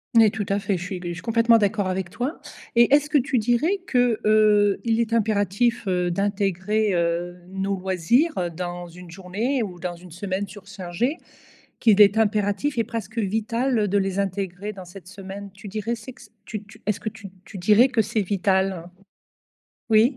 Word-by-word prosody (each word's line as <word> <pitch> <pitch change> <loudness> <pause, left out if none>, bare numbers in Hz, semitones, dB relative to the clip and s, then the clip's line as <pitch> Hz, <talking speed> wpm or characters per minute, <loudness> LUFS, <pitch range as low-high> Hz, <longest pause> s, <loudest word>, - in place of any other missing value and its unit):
Oui 220 -2 +7
tout 215 -2 -3
à 200 - +2
fait, 200 -1 -1
je 175 - -4
suis 190 +1 -5
c 180 - -7
je 175 - -3
suis 165 - -8
complètement 230 0 +4
d'accord 205 -1 +1
avec 185 -1 -2
toi. 250 - -4 0.4
Et 235 +4 +6
est-ce 295 +1 0
que 295 - +5
tu 265 0 0
dirais 245 - +2
que, 245 -3 +2
heu, 210 -2 +4
il 230 -1 +1
est 230 0 0
impératif, 215 +1 +1
heu, 180 -1 +1
d'intégrer, 200 +1 0
heu, 170 +1 -1
nos 195 +1 -2
loisirs, 190 - +1
heu, 175 -1 -1
dans 175 +1 -5
une 175 0 -12
journée 205 +9 -2
ou 180 -5 -5
dans 175 -1 -4
une 180 +1 -14
semaine 190 +3 -3
surchargée, 195 - -4 0.6
qu'il 215 -3 +5
est 205 +1 +6
impératif 210 +4 +1
et 230 - +3
presque 225 0 -5
vital 225 +2 0
de 200 +2 +1
les 195 0 0
intégrer 195 +1 -3
dans 190 -1 -9
cette 180 0 -13
semaine? 200 0 -8
Tu 200 0 -10
dirais 220 +3 -2
c'est 235 +3 -10
que 250 - -17
c - - -15
tu 215 -2 -6
tu 215 +1 -17
est-ce 210 -1 0
que 220 - -7
tu 210 -3 -11 0.2
tu 200 - -10
dirais 215 +7 +5
que 245 -4 +2
c'est 220 +1 -2
vital? 190 -2 0 1.0
Oui. 230 +5 +4
205 Hz, 195 wpm, -24 LUFS, 190-225 Hz, 1.0 s, Oui